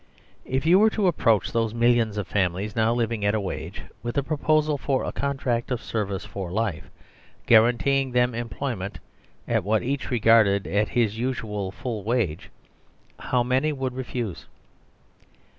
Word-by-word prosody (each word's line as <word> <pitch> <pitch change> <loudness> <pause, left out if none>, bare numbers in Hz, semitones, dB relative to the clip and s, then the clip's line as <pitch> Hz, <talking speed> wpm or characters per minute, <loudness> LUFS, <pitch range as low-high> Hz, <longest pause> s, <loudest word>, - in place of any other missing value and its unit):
If 130 +3 -2
you 175 +4 +6
were 220 +1 +6
to 210 - +2
approach 115 - +2
those 115 -1 0
millions 120 -2 +2
of 105 - -2
families 100 +1 -1
now 110 0 +2
living 115 -2 -1
at 100 +1 +2
a - - +1
wage, 90 -2 -5 0.2
with 120 0 -4
the 140 - +1
proposal 155 0 +1
for 135 -1 -1
a - - -3
contract 135 -4 -2
of 125 -3 -1
service 100 -4 -3
for 95 -3 -6
life, 100 -6 -2 0.6
guaranteeing 125 +4 +4
them 125 0 +2
employment 115 -3 -4 0.5
at - - +1
what 105 +3 +1
each 135 +2 -2
regarded 110 -4 +4
as 105 +1 0
his 115 -2 0
usual 110 -6 -2
full 110 +3 -5
wage, 110 -8 -1 0.7
how 125 -1 0
many 130 +5 +1
would 135 -3 -3
refuse 125 -6 -5
115 Hz, 155 wpm, -25 LUFS, 105-130 Hz, 0.7 s, you